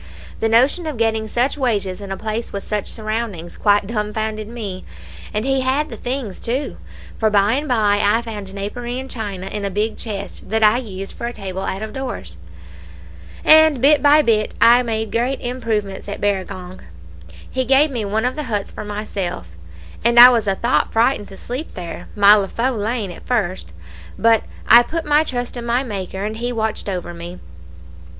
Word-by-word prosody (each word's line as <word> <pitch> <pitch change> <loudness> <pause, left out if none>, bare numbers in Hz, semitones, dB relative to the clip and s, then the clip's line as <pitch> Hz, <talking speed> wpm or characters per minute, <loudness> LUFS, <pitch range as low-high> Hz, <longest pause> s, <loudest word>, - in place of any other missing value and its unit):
The 225 - +1
notion 265 +9 +3
of 300 -5 -4
getting 220 -1 0
such 250 +6 0
wages 205 -7 -1
in 200 -1 -7
a 195 - -3
place 220 +2 -4
with 200 - -5
such 210 -2 -3
surroundings 215 -6 -4
quite 205 -1 +3
dumb 210 0 -3
founded 215 -1 -3
me; 210 -5 -6 0.5
and 210 +3 -2
he 270 0 +2
had 275 +4 0
the - - -7
things 245 -6 -4
too; 255 +5 -3 0.4
for 220 - +3
by 205 +1 +3
and 290 +3 -1
by 210 -5 +2
I 215 +3 +3
found 210 -4 -7
napery 240 +5 -5
and 265 0 -7
china 200 -5 -5
in 205 +1 -4
a 200 - -1
big 210 +3 -1
chest 200 -3 -6
that 220 +1 +1
I 215 +2 +6
used 195 -5 -7
for 235 - -4
a 240 - -5
table 190 -3 -5
out 195 +1 -3
of 220 - -6
doors; 240 - -6 1.1
and 315 -3 +7
bit 285 +2 +5
by 295 +2 +6
bit 215 -3 +1
I 235 +2 +7
made 220 -2 -2
great 245 +4 0
improvements 225 -6 -3
at 200 - -5
Barragong. 185 -2 -3 0.7
He 260 - -1
gave 270 +4 +4
me 240 -4 -2
one 215 +3 -1
of 250 - -1
the 300 -1 -4
huts 205 -3 -2
for - - -7
myself, 205 - -4 0.5
and 235 +1 +5
I 245 +1 +12
was 230 -4 +1
a 195 - +2
thought 235 +5 +1
frightened 225 -1 +2
to 195 - -12
sleep 260 +7 -6
there 175 -2 -7
my 205 0 +7
leafu' 230 +5 +1
lane 215 -2 -2
at - - -12
first, 190 - -1 0.5
but 225 -1 +3 0.2
I 235 - +9
put 325 +7 -4
my 300 +1 +4
trust 245 -5 -4
in 235 - -5
my 245 +3 +1
Maker, 195 -4 -5
and 215 +1 -4
He 240 +2 -2
watched 220 -3 -2
over 180 -2 -4
me. 170 +1 -8
220 Hz, 190 wpm, -20 LUFS, 200-245 Hz, 1.1 s, I